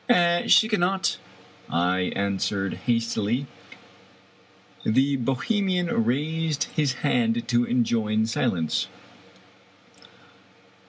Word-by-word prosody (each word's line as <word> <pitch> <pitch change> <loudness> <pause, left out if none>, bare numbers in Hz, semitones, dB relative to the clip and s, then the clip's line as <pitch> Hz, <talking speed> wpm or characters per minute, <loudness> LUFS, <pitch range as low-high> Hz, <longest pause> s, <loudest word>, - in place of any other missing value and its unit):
"She 220 - +6
cannot," 190 -3 0 0.5
I 90 +2 0
answered 100 0 -1
hastily. 115 +1 0 1.4
The 135 +5 +2
Bohemian 175 - 0
raised 155 +4 -1
his 145 -4 +1
hand 115 -1 +1
to 120 0 +2
enjoin 110 -3 +1
silence. 85 -7 -1
120 Hz, 70 wpm, -25 LUFS, 110-150 Hz, 1.4 s, She